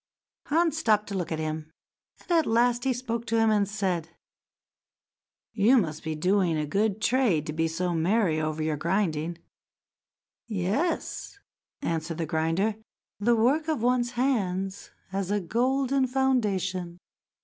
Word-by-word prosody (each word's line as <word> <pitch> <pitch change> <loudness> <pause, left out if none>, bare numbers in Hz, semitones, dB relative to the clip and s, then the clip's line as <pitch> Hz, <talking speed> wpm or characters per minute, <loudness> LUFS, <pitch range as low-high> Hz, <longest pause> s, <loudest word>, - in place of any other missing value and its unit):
Hans 320 0 +2
stopped 215 -7 +3
to - - -5
look 175 -3 -3
at 160 - -1
him, 155 0 -4 0.5
and - - -10
at 330 -3 +3
last 240 +2 +2
he 265 - +3
spoke 235 -2 -3
to 230 - +1
him 225 -1 +4
and 205 -2 +2
said: 185 -6 -2 1.4
"You 225 +4 +5
must 155 -8 -1
be 160 -1 -3
doing 180 0 +2
a 150 - -1
good 200 +6 0
trade 220 - +2
to 155 - -4
be 165 +1 +1
so 175 +2 -2
merry 170 -1 +2
over 155 0 -2
your 155 -1 -1
grinding." 170 -1 -1 1.1
"Yes," 220 - -2 0.5
answered 165 0 -2
the 165 - -1
grinder. 165 +7 0 0.4
"The 235 +3 +3
work 270 +8 +2
of 305 -8 -1
one's 245 -1 +1
hands 195 -7 -1 0.2
has 195 -1 -2
a 205 0 +1
golden 260 +7 +1
foundation. 195 -9 0
200 Hz, 145 wpm, -27 LUFS, 165-240 Hz, 1.4 s, You